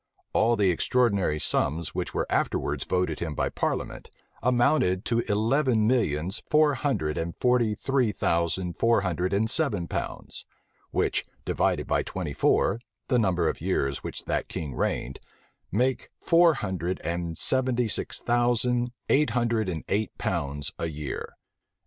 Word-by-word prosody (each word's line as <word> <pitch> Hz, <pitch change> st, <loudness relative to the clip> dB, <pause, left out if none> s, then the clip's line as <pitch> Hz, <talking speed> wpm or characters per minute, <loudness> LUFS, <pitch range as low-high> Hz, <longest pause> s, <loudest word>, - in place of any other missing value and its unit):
[] -, -, -51 dB
All 115 Hz, +2 st, +3 dB
the 100 Hz, -4 st, +3 dB
extraordinary 100 Hz, -5 st, +1 dB
sums 75 Hz, +2 st, 0 dB
which -, -, -3 dB
were -, -, -1 dB
afterwards -, -, -1 dB
voted 90 Hz, 0 st, 0 dB
him 80 Hz, -3 st, -3 dB
by -, -, 0 dB
parliament, -, -, -3 dB, 0.3 s
amounted 120 Hz, -6 st, +2 dB
to 115 Hz, -1 st, +1 dB
eleven 115 Hz, +2 st, +2 dB
millions 95 Hz, -, 0 dB
four 150 Hz, -1 st, +4 dB
hundred 80 Hz, -, -1 dB
and 85 Hz, +1 st, -3 dB
forty 120 Hz, -4 st, +2 dB
three 130 Hz, 0 st, +1 dB
thousand 85 Hz, 0 st, -1 dB
four 115 Hz, -2 st, +4 dB
hundred 90 Hz, -1 st, -1 dB
and 100 Hz, +3 st, +2 dB
seven 110 Hz, -, +1 dB
pounds; -, -, -5 dB, 0.4 s
which, -, -, 0 dB, 0.2 s
divided -, -, +1 dB
by -, -, +1 dB
twenty 85 Hz, -6 st, -4 dB
four, 100 Hz, +8 st, +2 dB, 0.3 s
the 125 Hz, -3 st, +3 dB
number 90 Hz, -6 st, +2 dB
of -, -, -2 dB
years 70 Hz, 0 st, -1 dB
which -, -, -6 dB
that -, -, -1 dB
king 75 Hz, -4 st, -5 dB
reigned, 65 Hz, +2 st, -2 dB, 0.5 s
make 125 Hz, +6 st, 0 dB
four 170 Hz, -1 st, +5 dB
hundred 95 Hz, -6 st, -3 dB
and 85 Hz, -1 st, -3 dB
seventy 125 Hz, -2 st, +1 dB
six 110 Hz, -, -1 dB
thousand 120 Hz, 0 st, +1 dB, 0.2 s
eight 150 Hz, +2 st, +3 dB
hundred 115 Hz, -4 st, 0 dB
and 80 Hz, -4 st, -4 dB
eight 105 Hz, +2 st, -1 dB
pounds 70 Hz, 0 st, -2 dB
a 85 Hz, -, -1 dB
year. 75 Hz, -3 st, -5 dB
105 Hz, 150 wpm, -27 LUFS, 85-125 Hz, 0.5 s, four